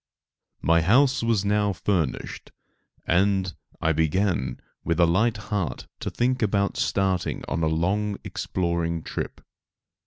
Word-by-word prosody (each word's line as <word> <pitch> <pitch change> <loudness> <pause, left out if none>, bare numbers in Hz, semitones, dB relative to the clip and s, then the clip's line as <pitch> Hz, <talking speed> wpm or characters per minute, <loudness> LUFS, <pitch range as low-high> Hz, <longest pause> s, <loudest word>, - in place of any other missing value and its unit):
* - - -53
My 85 0 +5
house 125 - +4
was 115 -4 +1
now 105 0 +2
finished, 90 -3 -2 0.5
and 95 +1 +2 0.3
I 80 - +2
began, 80 -4 0 0.2
with 85 0 0
a 85 - +7
light 105 +7 +2
heart 100 - -3
to - - -3
think 125 +1 0
about 100 -2 +1
starting 95 -2 0
on 85 - -1
a 80 - +2
long 100 +6 0
exploring 85 -3 -2
trip. - - -5
95 Hz, 130 wpm, -25 LUFS, 85-105 Hz, 0.5 s, a